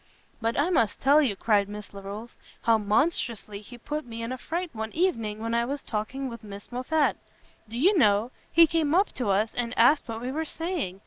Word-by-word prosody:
"But 230 +3 0
I 320 +6 +2
must 230 - +2
tell 285 +3 +5
you," 245 -9 +1
cried 205 -1 +2
Miss 210 0 -8
Larolles, 200 +4 -8 0.3
"how 225 -1 +4
monstrously 215 -2 0
he 245 +3 -12
put 300 +5 -4
me 230 -2 -7
in 230 - -4
a 255 - -3
fright 345 +4 -3
one 220 -1 -4
evening 230 - 0
when 230 +1 -3
I 235 0 +2
was 275 +4 -3
talking 250 +5 -3
with 235 -2 -8
Miss 200 +1 -10
Moffat. 285 +5 +1 0.5
Do 230 - -6
you 370 +11 +4
know, 215 - +3 0.2
he 335 0 +7
came 320 -1 +1
up 390 +3 +4
to 250 -4 -3
us, 210 +3 +1
and 245 0 -2
asked 250 +6 +5
what 225 -1 -4
we 250 +2 -3
were 315 +4 -2
saying! 320 - -4
235 Hz, 210 wpm, -27 LUFS, 215-295 Hz, 0.5 s, he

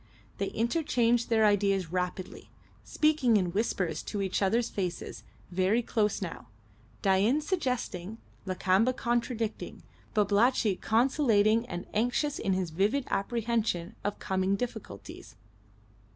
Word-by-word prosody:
They - - 0
interchanged 235 -2 +1
their 220 -2 +4
ideas 195 -4 +2
rapidly, 180 +1 -4 0.3
speaking 300 -7 +2
in 180 -3 0
whispers 185 -4 -1
into 205 -1 -3
each 190 +1 -1
other's 225 +5 +2
faces, 180 -4 -4 0.3
very 190 +6 +2
close 210 -3 0
now, 165 -8 -7 0.6
Dain 200 +9 +3
suggesting, 250 - -3 0.3
Lakamba 190 +6 +2
contradicting, 235 -2 -2 0.3
Babalatchi 210 0 +3
conciliating 230 -2 +2
and 175 -3 -5
anxious 245 +6 0
in 195 - 0
his 185 -3 -1
vivid 210 - +1
apprehension 220 -3 -1
of 205 - -2
coming 190 0 0
difficulties. 220 - -7
210 Hz, 110 wpm, -29 LUFS, 190-235 Hz, 0.6 s, their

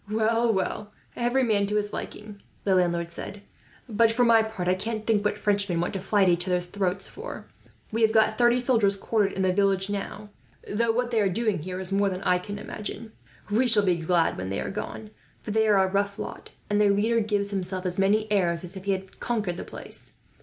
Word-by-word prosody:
"Well, 225 +2 +2
well, 205 +1 -2 0.2
every 245 +2 +1
man 205 -4 +2
to 210 - -2
his 210 0 -1
liking," 210 -1 -7 0.2
the 195 - +2
landlord 170 -2 +1
said; 200 +4 -8 0.4
"but 225 0 +3
for 245 +2 +2
my 230 -1 +6
part, 220 -5 -4
I 180 - +4
can't 220 +3 -4
think 215 -3 +2
what 210 - 0
Frenchmen 200 -4 +1
want 175 - -1
to 195 - -2
fly 200 +2 +2
at 190 - +4
each 175 +1 +1
others' 180 -1 0
throats 190 +1 -1
for. 455 +5 -8 0.5
We 225 +1 -1
have 220 -1 +5
got 220 -1 +3
thirty 240 +1 +4
soldiers 230 -6 +2
quartered 205 0 0
in 190 - -1
the 185 -1 +2
village 195 0 +1
now, 205 +1 -5 0.4
though 230 +2 +1
what 245 +1 -1
they 225 -2 +2
are 200 - +2
doing 210 0 0
here 180 +4 -5
is 190 0 -4
more 200 0 +2
than 185 0 -5
I 180 0 +3
can 205 +3 -6
imagine. 215 +2 -7 0.4
We 240 +5 +3
shall 215 -3 +5
be 180 -2 +3
glad 165 - +1
when 95 0 -4
they 95 - -2
are - - -3
gone; 210 +1 -6 0.3
for - - -5
they 220 +1 +2
are 210 -2 +5
a 190 0 +4
rough 200 0 0
lot, - - -7 0.2
and 205 0 +2
their 205 - +5
leader 220 +4 +2
gives 205 -2 -1
himself 185 -1 -3
as 180 +1 -1
many 205 +3 +3
airs 175 -4 +2
as 180 +2 -6
if 190 0 -8
he 200 - +2
had 190 0 -7
conquered 210 -7 -2
the - - -5
place. - - -8
205 Hz, 230 wpm, -26 LUFS, 185-220 Hz, 0.5 s, my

